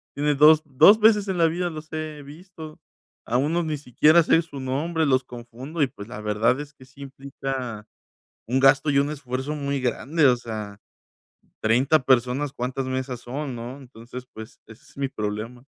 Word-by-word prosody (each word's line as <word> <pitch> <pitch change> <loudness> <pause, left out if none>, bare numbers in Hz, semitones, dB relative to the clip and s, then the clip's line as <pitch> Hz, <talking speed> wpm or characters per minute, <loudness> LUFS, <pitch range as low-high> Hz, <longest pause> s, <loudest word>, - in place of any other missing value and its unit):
Tiene 145 0 +1
2- 155 +2 +6
2 170 +10 +6
veces 210 -2 +4
en 190 -2 -2
la 165 - +5
vida, 175 +2 -2
los 155 0 -10
he 155 -2 -5
visto. 155 +1 -12 0.5
A 120 - 0
uno 160 +6 0
ni 155 -2 -3
siquiera 150 +5 +4
sé 165 +1 +3
su 145 -4 -10
nombre, 155 +5 -1
los 130 -2 +2
confundo 125 +6 -8
y 140 - +4
pues 105 -3 -11
la 120 -3 -8
verdad 105 +5 +1
es 145 0 -8
que 130 - -18
sí 135 +2 -17
implica 135 -5 -6 0.6
un 130 +2 +1
gasto 135 +2 +4
y 140 - +2
un 140 +1 +1
esfuerzo 135 0 -4
muy 140 -2 -2
grande, 140 +5 +1
o 125 -1 +5
sea, 110 -3 -7 0.8
30 130 +7 +3
personas, 130 +2 +1
¿cuántas 130 +2 -4
mesas 130 -1 -4
son, 135 +2 -5
no? 120 +3 -7
Entonces, 125 -1 -11
pues, 110 0 -11
ese 115 +2 -15
es - - -22
mi 140 -1 -2
problema. 110 +3 -5
135 Hz, 185 wpm, -24 LUFS, 125-150 Hz, 0.8 s, 2